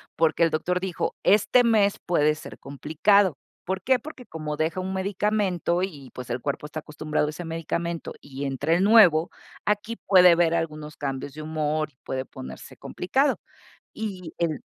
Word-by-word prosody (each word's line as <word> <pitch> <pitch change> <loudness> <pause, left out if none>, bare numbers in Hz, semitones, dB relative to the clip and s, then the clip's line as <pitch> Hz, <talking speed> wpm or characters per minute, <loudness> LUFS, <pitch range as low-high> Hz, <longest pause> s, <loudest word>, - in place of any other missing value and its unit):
porque 165 +1 +2
el 165 - +3
doctor 180 +3 0
dijo: 185 -2 -3
"Este 215 +5 +5
mes 210 -4 +3
puede 150 -3 +3
ser - - -11
complicado". 160 +5 +2 0.3
¿Por 190 +1 -2
qué? 260 -1 +3
Porque 260 -1 -11
como 155 -2 -5
deja 160 +4 -1
un 190 +1 -3
medicamento 190 -3 0
y, 150 -9 -5
pues, 125 -1 -8
el 120 - -2
cuerpo 140 +3 -3
está 155 +1 -6
acostumbrado 150 0 -2
a - - -1
ese 165 +3 -7
medicamento, 165 +1 -3
y 140 0 -6
entra 140 +4 0
el 180 - +2
nuevo, 185 -7 +6 0.3
aquí 210 +2 -1
puede 180 -3 +7
haber 170 -1 +3
algunos 155 -2 -3
cambios 135 -1 -4
de 155 - -8
humor, 155 0 -1
y 125 - -40
puede 130 0 -3
ponerse 65 - -10
complicado. 270 +10 0 0.5
Y 190 -6 -6
el 160 -4 -1
165 Hz, 170 wpm, -25 LUFS, 150-190 Hz, 0.5 s, puede